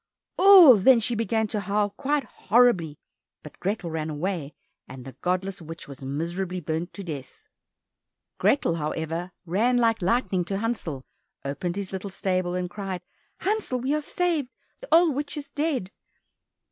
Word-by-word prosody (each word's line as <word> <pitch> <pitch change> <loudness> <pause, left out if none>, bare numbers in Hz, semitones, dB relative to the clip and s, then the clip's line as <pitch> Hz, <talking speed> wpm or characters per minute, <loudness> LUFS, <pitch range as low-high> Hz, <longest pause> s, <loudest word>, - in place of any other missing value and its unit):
Oh! 365 - +9
then 240 +5 +6
she 235 +2 -1
began 225 0 0
to 210 - -1
howl 205 0 0
quite 285 +7 -1
horribly, 205 -9 +2 0.5
but - - -12
Grethel 190 -3 -2
ran 160 -1 -3
away, 155 -1 -3 0.3
and 130 -1 -10
the 135 - -7
godless 185 +1 -1
witch 165 +1 -9
was 140 -1 -9
miserably 170 +7 -3
burnt 160 +2 -3
to 200 - -6
death. 160 - -8 0.9
Grethel, 170 -12 +2
however, 165 +3 -3
ran 220 +9 +2
like 230 -2 +2
lightning 190 -1 +1
to 195 +2 -2
Hansel, 200 - -3 0.4
opened 160 +6 -3
his 200 -1 -4
little 190 +1 -4
stable, 185 -2 -1
and 180 0 -2
cried, 185 -1 -5 0.4
"Hansel, 405 -11 -1
we 265 +3 0
are 305 - 0
saved! 320 -4 -1 0.3
The - - -10
old 330 -1 +6
witch 290 +2 -4
is 285 -1 -7
dead!" 285 - -1
195 Hz, 155 wpm, -25 LUFS, 170-250 Hz, 0.9 s, Oh